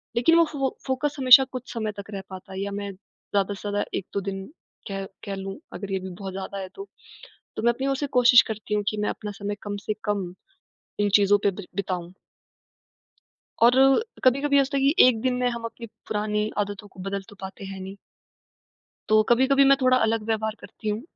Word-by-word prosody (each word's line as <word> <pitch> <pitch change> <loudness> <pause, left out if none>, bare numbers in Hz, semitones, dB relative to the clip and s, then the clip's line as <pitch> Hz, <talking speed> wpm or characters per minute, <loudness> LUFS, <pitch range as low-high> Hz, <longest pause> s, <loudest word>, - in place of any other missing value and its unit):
लेकिन 245 +8 +4
वो 335 - +6
फ़ो 270 -2 0 0.2
फ़ोकस 265 +3 -1
हमेशा 260 +1 +9
कुछ 255 -1 -7
समय 220 -2 -2
तक 200 - -9
रह 195 - -4
पाता 190 0 -10
है, 190 - -5
या 200 - -3
मैं 200 0 -4
ज़्यादा-से-ज़्यादा 205 +1 -3
1-2 200 +1 -4
दिन 195 0 -5 0.4
कह 195 0 -4 0.2
कह 200 -2 -4
लूँ, 195 0 -6 0.2
अगर 200 -1 -6
ये 190 - 0
भी 190 - -7
बहुत 195 -2 -6
ज़्यादा 195 +1 -6
है 190 - -5
तो। 395 0 -8 0.7
तो - - -3
मैं 235 - +4
अपनी 265 +3 -4
ओर 275 - +1
से 290 +1 -2
कोशिश 245 -1 +8
करती 215 -1 -4
हूँ 210 - +1
कि 215 - -1
मैं 210 - 0
अपना 210 -1 -6
समय 205 +1 -3
कम-से-कम 205 -2 -3 0.7
इन 205 - +3
चीजों 205 0 +5
पे 200 - +3
बिर 195 0 -9
बिताऊँ। 180 -3 -3 1.5
और 235 - +7 0.5
कभी-कभी 280 +3 +3
ये - - +7
हो - - +3
सकता 280 +1 -3
है - - 0
कि 275 +2 +4
1 230 -3 +1
दिन 255 -1 +1
में 250 0 +1
हम 235 -1 -6
अपनी 230 0 -7 0.2
पुरानी 210 0 -1
आदतों 205 0 -3
को 190 - -14
बदल 195 +1 -3
तो - - -13
पाते 190 +1 -8
हैं 195 0 -7
नहीं। 190 +1 -8 1.1
तो 215 0 +5
कभी-कभी 265 +3 +4
मैं 275 0 +6
थोड़ा 255 0 +5
अलग 225 -2 +1
व्यवहार 220 -1 -1
करती 215 - -8
हूँ। 210 +2 -2
210 Hz, 205 wpm, -25 LUFS, 195-250 Hz, 1.5 s, हमेशा